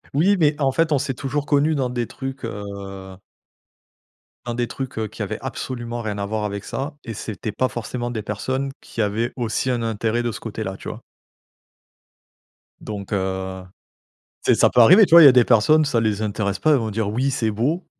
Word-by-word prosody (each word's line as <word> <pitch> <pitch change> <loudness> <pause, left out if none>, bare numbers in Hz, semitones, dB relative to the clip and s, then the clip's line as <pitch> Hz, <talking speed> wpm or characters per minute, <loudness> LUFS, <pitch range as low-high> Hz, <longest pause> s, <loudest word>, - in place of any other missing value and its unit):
Oui 190 +7 +4
mais 150 -3 +2
en 135 -2 +2
fait 165 +3 +1
on 145 - +4
s'est 135 - -2
toujours 140 +3 -3
connu 150 +2 +2
dans 130 -3 0
des 120 -2 -2
trucs, 135 0 -7
heu 100 -3 -7 1.3
dans 120 - -3
des 120 0 -1
trucs, 130 -2 -6
heu, 110 - -1
qui - - -10
avaient - - -4
absolument 120 -2 -5
rien 105 -2 -4
à 100 - -2
voir 110 +1 -2
avec 100 -1 -4
ça 145 +3 -5
et 115 - -6
c'était 110 0 -5
pas 130 +4 0
forcément 120 +1 -4
des 110 -3 -4
personnes 130 +7 -3
qui 115 - -5
avaient 110 +3 0
aussi 120 +1 -1
un 120 -2 0
intérêt 115 +1 -1
de 120 - -1
ce - - -7
côté - - -5
là, - - -5
tu - - -7
vois? - - -8 1.8
Donc 100 -2 -7
heu, 95 -1 -3 0.8
tu - - +5
sais, - - +3
ça - - +6
peut 125 - +5
arriver 185 - +8
tu 165 - -2
vois? 170 - +11
Il - - +10
y - - +12
a - - +9
des 125 -1 +6
personnes 150 +7 +4
ça 130 -5 +1
les 110 -2 0
intéresse 100 -2 -2
pas, 155 - +3
ils 145 - +5
vont 110 -3 -2
dire 105 -1 -1
oui 130 +6 0
c'est 115 -4 0
beau, 145 - -1
120 Hz, 215 wpm, -22 LUFS, 105-135 Hz, 1.8 s, y